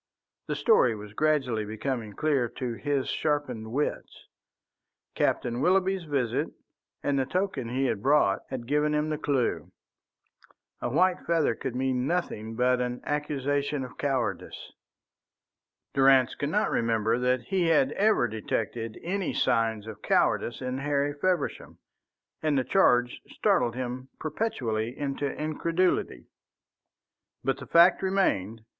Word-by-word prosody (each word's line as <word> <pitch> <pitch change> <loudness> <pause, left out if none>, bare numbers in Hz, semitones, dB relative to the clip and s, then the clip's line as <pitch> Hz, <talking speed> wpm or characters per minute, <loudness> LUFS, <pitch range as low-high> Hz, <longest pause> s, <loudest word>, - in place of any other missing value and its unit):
The - - -1
story 120 -3 +4
was 105 -1 -10
gradually 135 -6 +1
becoming 110 +1 -4
clear 140 -2 +1
to 125 0 -4
his 140 +2 -1
sharpened 130 -8 -2
wits. 145 +5 -3 0.9
Captain 120 +1 0
Willoughby's 190 +1 +2
visit 135 -6 0 0.6
and 140 -1 +1
the 130 - +1
token 180 -9 -2
he 130 +3 0
had 110 -6 -1
brought 145 +5 +3
had 130 -3 -5
given 150 +3 +1
him 150 +1 0
the 155 - -2
clue. 140 -5 -1 1.1
A - - -1
white 180 +7 +3
feather 165 -3 +2
could 130 -2 -5
mean 130 0 0
nothing 115 -11 -2
but 125 +1 +2
an 125 0 -3
accusation 145 -1 -1
of 125 - -10
cowardice. 125 -9 -2 1.2
Durrance 135 -2 +5
could 145 - -3
not 210 +6 +1
remember 115 0 +1
that 125 0 +1
he 175 +7 0
had 150 -4 +3
ever 205 - +3
detected 115 +1 -3
any 190 +1 -2
signs 110 -2 +1
of 110 -1 -9
cowardice 120 - +1
in 130 +1 -3
Harry 145 0 0
Feversham, 180 +5 -2 0.6
and 155 -2 +1
the 130 - +2
charge 125 -8 +3
startled 120 0 +1
him 130 +1 -5
perpetually 125 - -2
into 140 0 -2
incredulity. 160 - -1 1.2
But - - 0
the - - -9
fact 170 +2 +6
remained. 115 - 0
135 Hz, 130 wpm, -27 LUFS, 120-150 Hz, 1.2 s, fact